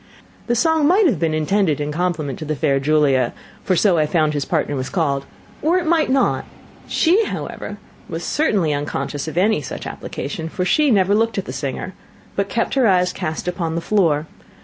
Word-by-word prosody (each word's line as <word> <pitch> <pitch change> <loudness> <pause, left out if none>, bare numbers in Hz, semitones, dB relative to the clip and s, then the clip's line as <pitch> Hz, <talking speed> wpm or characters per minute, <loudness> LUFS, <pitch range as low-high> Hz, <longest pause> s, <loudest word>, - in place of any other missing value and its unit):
The 240 - +1
song 320 +3 +3
might 385 +5 +4
have 240 - +2
been 160 -1 +1
intended 155 0 +1
in 145 0 -2
compliment 155 -5 -2
to 155 - -5
the 155 0 -2
fair 140 -1 +1
Julia, 140 -4 +2 0.3
for 185 - +1
so 180 -2 +3
I 155 - +2
found 155 -2 +1
his 145 -2 -1
partner 155 -3 -1
was 130 -1 -3
called, 140 -6 -1 0.3
or 330 +4 +3
it 360 - -1
might 320 -2 +2
not; 265 +1 +2 0.4
she, 365 +7 +3
however, - - -5 0.3
was - - -4
certainly 200 - +1
unconscious 145 0 -3
of 160 +1 -6
any 195 -2 +3
such 130 - -7
application, 160 +3 -5
for 180 +2 -2
she 295 +11 +3
never 200 -4 +3
looked 225 +1 +1
at 195 - -2
the - - -6
singer, 140 +6 -4 0.4
but 200 0 -1
kept 230 - -1
her 265 -4 +3
eyes 180 -2 +3
cast 155 +2 -4
upon 170 -2 -2
the - - 0
floor. 165 -5 +1
175 Hz, 195 wpm, -20 LUFS, 150-220 Hz, 0.4 s, might